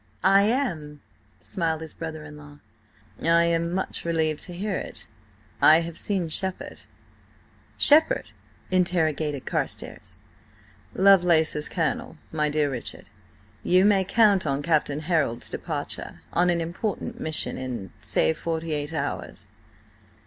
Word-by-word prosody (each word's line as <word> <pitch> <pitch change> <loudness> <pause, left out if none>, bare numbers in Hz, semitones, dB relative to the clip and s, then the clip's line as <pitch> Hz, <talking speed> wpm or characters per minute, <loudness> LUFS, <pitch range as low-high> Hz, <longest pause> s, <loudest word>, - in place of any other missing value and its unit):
"I 195 +1 +6
am," 160 - -2 0.4
smiled 165 -4 -2
his 160 -2 -8
brother 160 -2 -7
in 150 0 -11
law. 145 -1 -13 0.6
"I 170 +1 +4
am 170 0 0
much 190 +1 -2
relieved 160 -2 0
to 180 - -9
hear 200 +4 -3
it. - - -5 0.6
I 160 +2 +7
have 170 -1 -6
seen 185 -1 -1
Shepherd." 190 +3 -5 0.9
"Shepherd?" 305 +2 +5 0.4
interrogated 160 -6 0
Carstares. - - -3 0.8
"Lovelace's 175 -6 +5
colonel, - - -2
my 150 -1 0
dear 150 -1 0
Richard. 125 -3 -6 0.5
You 185 +2 +4
may 200 -2 +4
count 200 -3 +3
on 140 0 -1
Captain 150 -2 +1
Harold's 155 -8 -1
departure–on 175 +1 -3
an 170 -1 +1
important 175 +5 -4
mission–in, 130 - -1
say, 80 0 +2
forty 165 - -3
eight 150 +1 -3
hours." - - -4
165 Hz, 120 wpm, -25 LUFS, 150-185 Hz, 0.9 s, I